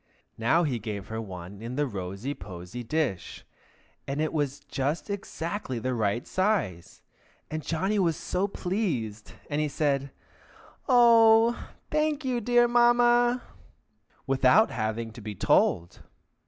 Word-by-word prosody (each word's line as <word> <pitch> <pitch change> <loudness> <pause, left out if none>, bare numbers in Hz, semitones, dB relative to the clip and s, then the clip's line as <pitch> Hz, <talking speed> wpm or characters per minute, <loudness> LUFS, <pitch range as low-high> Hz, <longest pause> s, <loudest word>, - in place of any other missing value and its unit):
Now 145 +10 +3
he 130 -7 -1
gave 105 -2 -6
her 110 0 -4
one 95 -1 -9
in 120 +2 -5
the 145 +1 +1
rosy 100 +3 -5
posy 90 +2 -8
dish, 125 - -3 0.6
and 140 +2 -3
it 155 0 -1
was 145 -2 -1
just 145 +9 -3
exactly 190 - -4
the 130 +3 -2
right 110 0 -1
size, 185 - -1 0.5
and 155 0 -3
Johnny 190 +7 -1
was 170 -5 +1
so 185 +2 -1
pleased, 160 - -3
and 150 0 -1
said, 140 -2 0 0.8
"Oh, 230 -2 +5 0.2
thank 305 -1 0
you, 250 -2 0
dear 240 +2 +4
Mamma!" 240 +1 +4 0.8
without 135 +10 +4
having 110 +1 -3
to 115 - -11
be 105 0 -6
told. 85 -1 +1
145 Hz, 125 wpm, -27 LUFS, -, 0.8 s, Oh